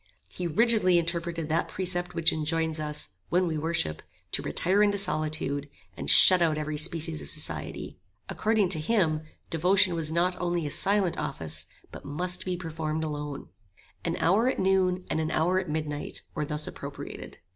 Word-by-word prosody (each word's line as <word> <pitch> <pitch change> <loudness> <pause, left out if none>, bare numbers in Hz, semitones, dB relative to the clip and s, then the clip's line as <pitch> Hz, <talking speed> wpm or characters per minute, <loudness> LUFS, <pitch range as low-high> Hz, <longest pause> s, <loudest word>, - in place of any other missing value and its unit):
He 180 - -5
rigidly 210 -1 +3
interpreted 170 -1 -2
that 160 +2 0
precept 180 -1 -2
which 165 0 +3
enjoins 160 0 -1
us, 150 -1 -3 0.2
when 180 +2 +2
we 165 -2 -2
worship, 150 - -2 0.3
to - - -1
retire 190 +4 +1
into 205 -1 +3
solitude, 155 -5 -1 0.3
and - - -4
shut 185 -1 +10
out 160 -2 +2
every 150 0 -3
species 165 -1 -2
of - - -2
society. - - -2 0.3
According 215 -3 +1
to 160 - +1
him 160 -4 +1 0.3
devotion 185 +3 +3
was 160 -2 -2
not 175 +2 +1
only 175 -2 -1
a 145 - -4
silent 195 -1 +2
office, 80 - -3 0.2
but - - -10
must 180 +5 -2
be 180 -1 -2
performed 160 -2 -4
alone. 150 -2 -5 0.5
An 170 0 -2
hour 215 +8 +2
at - - -2
noon, 185 -1 +1
and 155 - -2
an 160 0 -1
hour 180 +4 +1
at 185 -3 -5
midnight 150 -1 -4
were 150 - -2
thus 150 +1 -2
appropriated. - - -8
165 Hz, 165 wpm, -27 LUFS, 155-185 Hz, 0.5 s, shut